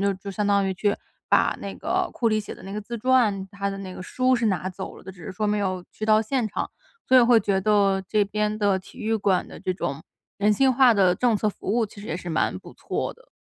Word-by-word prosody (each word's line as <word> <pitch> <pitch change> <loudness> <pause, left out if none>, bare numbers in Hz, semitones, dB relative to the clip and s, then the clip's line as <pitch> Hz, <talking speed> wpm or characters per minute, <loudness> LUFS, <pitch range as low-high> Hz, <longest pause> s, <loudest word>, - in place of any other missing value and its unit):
就 200 0 +2
就 195 +1 -8
相 210 +2 -2
当 200 -1 +3
于 190 - -1
去 205 +2 0 0.3
把 - - +3
那 - - -6
个 - - -1
库 230 - +1
里 215 0 +1
写 205 - -8
的 - - -15
那 195 - -7
个 210 - -3
自 235 +3 -6
传， 215 -6 +2
他 200 0 -3
的 195 - -6
那 185 -2 -7
个 - - -7
书 255 +6 +1
是 235 -2 +1
拿 185 -2 0
走 185 - -7
了 - - -14
的， 190 - -8
只 180 -3 -14
是 - - -5
说 210 +2 -2
没 210 0 +1
有 185 -3 -2
去 215 - -5
到 215 0 +5
现 230 0 -1
场， - - -3 0.4
所 260 - +5
以 - - +9
会 240 -1 +6
觉 195 -3 0
得 195 -2 +3
这 210 -2 +3
边 210 +1 -1
的 200 -2 +2
体 185 - -15
育 225 +1 -1
馆 200 -3 +1
的 - - -11
这 185 - -1
种 140 -4 -4 0.4
人 210 +1 +3
性 265 +5 +3
化 250 -1 +6
的 185 -3 +4
政 240 +2 +2
策 215 - 0
服 - - -9
务 230 -2 +2
其 200 - -13
实 210 - -9
也 - - -3
是 180 - -7
蛮 160 - 0
不 - - -13
错 - - -3
的。 - - -24
205 Hz, 295 characters per minute, -24 LUFS, 195-220 Hz, 0.4 s, 以